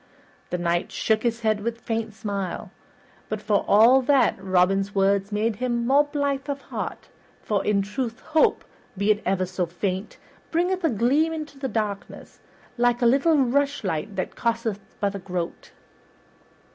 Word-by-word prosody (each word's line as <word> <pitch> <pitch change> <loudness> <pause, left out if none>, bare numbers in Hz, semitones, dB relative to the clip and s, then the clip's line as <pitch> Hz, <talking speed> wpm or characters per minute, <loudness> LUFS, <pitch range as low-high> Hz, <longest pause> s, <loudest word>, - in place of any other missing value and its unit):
The 180 - -1
Knight 175 0 -1
shook 220 -1 +1
his 235 -1 -1
head 215 -2 +1
with 230 +2 -2
a - - -26
faint 225 -2 -3
smile, 200 -3 -4 0.6
but 215 - -2
for 210 -1 +1
all 235 +6 +6
that, 265 -2 +3
Robin's 195 +2 +2
words 195 +1 +2
made 215 +1 0
him 240 -1 -1
more 280 +4 +4
blithe 285 -1 -2
of 280 0 -2
heart, - - -6 0.3
for 205 -2 0
in 200 -1 +2
truth 230 +3 -4
hope, 315 0 +2 0.3
be 200 +2 +3
it 210 0 0
never 185 0 +1
so 180 -1 -2
faint, 185 +3 -3 0.3
bringeth 355 +2 0
a 325 - +3
gleam 275 +8 +2
into 290 -4 -5
darkness, 210 -4 -4 0.4
like 245 0 +2
a - - +4
little 280 +6 +4
rushlight 240 - 0
that 185 - -3
costeth 230 -3 -1 0.2
but 200 -1 0
a 200 - -5
groat. 180 -2 -5
220 Hz, 160 wpm, -24 LUFS, 195-265 Hz, 0.6 s, all